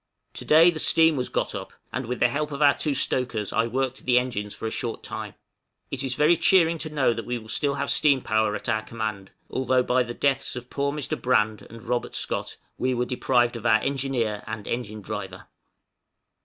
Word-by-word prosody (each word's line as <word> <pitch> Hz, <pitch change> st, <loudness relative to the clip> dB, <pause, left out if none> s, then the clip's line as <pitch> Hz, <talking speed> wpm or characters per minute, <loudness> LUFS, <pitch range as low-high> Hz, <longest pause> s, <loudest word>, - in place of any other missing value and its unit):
To -, -, -7 dB
day 165 Hz, +3 st, +7 dB
the 160 Hz, -, -6 dB
steam 160 Hz, 0 st, +5 dB
was 125 Hz, -2 st, -2 dB
got -, -, -1 dB
up, -, -, -7 dB, 0.2 s
and 130 Hz, -2 st, -3 dB
with 125 Hz, +1 st, -3 dB
the 125 Hz, -, +5 dB
help 150 Hz, +4 st, -2 dB
of 140 Hz, -, -5 dB
our 145 Hz, -1 st, +6 dB
two 150 Hz, -3 st, -1 dB
stokers 120 Hz, -6 st, -1 dB
I 115 Hz, +1 st, +2 dB
worked 130 Hz, +2 st, -2 dB
the 125 Hz, -1 st, +4 dB
engines 105 Hz, -5 st, -1 dB
for -, -, -7 dB
a 110 Hz, -, -2 dB
short 115 Hz, -2 st, -4 dB
time. -, -, -6 dB, 0.6 s
It 140 Hz, -1 st, -2 dB
is 130 Hz, -2 st, -1 dB
very 150 Hz, +5 st, +4 dB
cheering 170 Hz, -2 st, +3 dB
to 155 Hz, -, -4 dB
know 140 Hz, -5 st, +2 dB
that 115 Hz, 0 st, -5 dB
we 120 Hz, -3 st, -5 dB
still 140 Hz, +3 st, 0 dB
have -, -, -1 dB
steam 140 Hz, -3 st, +4 dB
power 110 Hz, 0 st, +1 dB
at -, -, -6 dB
our 110 Hz, -2 st, +1 dB
command, 110 Hz, -3 st, -5 dB, 0.2 s
although, 130 Hz, -1 st, +1 dB
by 125 Hz, +1 st, +2 dB
the 120 Hz, -1 st, -4 dB
deaths 140 Hz, -2 st, 0 dB
of 125 Hz, 0 st, -8 dB
poor 140 Hz, 0 st, -1 dB
Mr. 150 Hz, -3 st, -4 dB
Brand 110 Hz, -4 st, +2 dB
and 115 Hz, 0 st, -12 dB
Robert 120 Hz, +1 st, -2 dB
Scott, -, -, -3 dB, 0.2 s
we 130 Hz, 0 st, +1 dB
were 125 Hz, 0 st, 0 dB
deprived 120 Hz, -1 st, +1 dB
of 115 Hz, 0 st, -3 dB
our 110 Hz, -2 st, +5 dB
engineer 130 Hz, -6 st, -1 dB
and 110 Hz, -2 st, -5 dB
engine 110 Hz, -3 st, -4 dB
driver. 95 Hz, 0 st, -6 dB
125 Hz, 210 wpm, -25 LUFS, 110-140 Hz, 0.6 s, day